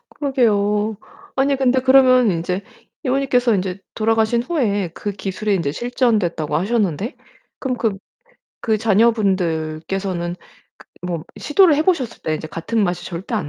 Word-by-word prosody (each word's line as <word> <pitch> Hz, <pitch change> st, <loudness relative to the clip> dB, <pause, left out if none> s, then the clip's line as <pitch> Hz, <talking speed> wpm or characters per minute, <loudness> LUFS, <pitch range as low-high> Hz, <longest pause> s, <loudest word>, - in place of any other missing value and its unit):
그러게요. 215 Hz, -6 st, +1 dB, 0.4 s
아니 275 Hz, +1 st, +2 dB
근데 260 Hz, -1 st, +2 dB
그러면 255 Hz, -3 st, +5 dB
인제 180 Hz, +2 st, -2 dB, 0.4 s
이모님께서 255 Hz, -3 st, +2 dB
이제 185 Hz, 0 st, -3 dB
돌아가신 225 Hz, +1 st, +1 dB
후에 210 Hz, -, 0 dB
그 205 Hz, -, -4 dB
기술이 200 Hz, +1 st, -2 dB
인제 145 Hz, -6 st, -1 dB
실전됐다고 215 Hz, -, 0 dB
하셨는데 205 Hz, -, -1 dB, 0.4 s
그럼 255 Hz, -2 st, -2 dB, 0.8 s
그 220 Hz, -2 st, 0 dB
자녀분들께서는 185 Hz, -5 st, 0 dB, 0.4 s
그 -, -, -18 dB, 0.2 s
뭐 170 Hz, -3 st, -3 dB, 0.2 s
시도를 320 Hz, +2 st, +4 dB
해 305 Hz, -, +2 dB
보셨을 300 Hz, -10 st, -1 dB
때 155 Hz, -, -1 dB
이제 155 Hz, 0 st, -6 dB
같은 190 Hz, +8 st, -2 dB
맛이 175 Hz, -2 st, -1 dB
절대 185 Hz, +6 st, -5 dB
안 185 Hz, -9 st, -2 dB
210 Hz, 310 characters per minute, -20 LUFS, 180-250 Hz, 0.8 s, 그러면